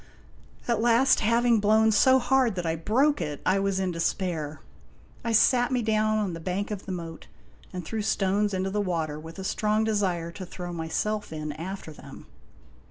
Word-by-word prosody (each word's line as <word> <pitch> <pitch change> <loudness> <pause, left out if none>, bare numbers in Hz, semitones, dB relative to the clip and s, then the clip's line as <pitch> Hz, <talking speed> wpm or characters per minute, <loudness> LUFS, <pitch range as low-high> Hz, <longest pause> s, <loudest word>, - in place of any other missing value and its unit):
At 235 -3 +1
last, 240 +3 +4
having 230 +1 +3
blown 220 +2 +4
so 260 +5 +5
hard 255 -3 +2
that 180 -2 -3
I 160 0 0
broke 260 - +1
it, 145 -1 -4
I 190 +1 +3
was 195 -1 0
in 190 -1 -1
despair. 165 -3 -2 0.6
I 230 - -1
sat 245 +3 +4
me 250 -2 0
down 215 0 +1
on 205 -4 -1
the 165 - -6
bank 185 +5 -3
of 205 -1 -6
the - - -4
moat 165 -3 -7 0.4
and 180 -2 -6
threw 220 +5 -3
stones 205 -1 +1
into 190 0 -2
the 210 +1 0
water, 160 -6 -2
with 160 +1 -10
a 190 - -6
strong 215 +2 0
desire 190 -6 -1
to 185 - -8
throw 175 -1 -7
myself 175 +6 -2
in 155 -1 -4
after 165 +1 -7
them. - - -12
195 Hz, 185 wpm, -26 LUFS, 170-220 Hz, 0.6 s, so